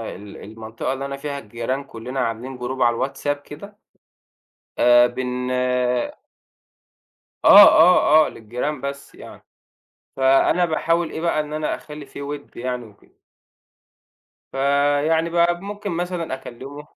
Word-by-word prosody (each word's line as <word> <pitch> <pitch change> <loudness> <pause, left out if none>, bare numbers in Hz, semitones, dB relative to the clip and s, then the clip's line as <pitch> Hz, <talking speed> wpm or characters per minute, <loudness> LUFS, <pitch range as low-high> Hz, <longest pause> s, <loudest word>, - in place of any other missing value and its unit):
ال 100 +1 -11
المنطقة 110 +4 -6
اللي 135 +1 -5
أنا 140 0 -5
فيها 140 0 -5
الجيران 120 +4 -4
كلّنا 125 0 -7
عاملين 125 +2 -3
group 130 +2 -5
على 120 +2 +2
الWhatsApp 145 0 -3
كده. 200 +9 -11 1.1
آآ 120 0 +7
بن 130 0 -3 2.1
آه، - - +10
آه، 155 -2 +5
آه، - - -4
للجيران 125 +6 -5
بس 140 +1 -7
يعني، - - -13 0.7
فأنا 135 +6 +3
باحاول 165 0 0
إيه - - -6
بقى، 170 -2 0
إن 150 0 -4
أنا 155 0 -2
أخلّي 150 -1 -11
في 140 - -10
ود 145 0 -8
يعني 125 0 -4
وكده. 105 -2 -21 1.3
فيعني 145 +4 +1
بقى 175 0 +2
ممكن 205 +1 -6
مثلًا 175 -3 -3
أكلمه 135 +3 -10
140 Hz, 125 wpm, -21 LUFS, 125-155 Hz, 2.1 s, آه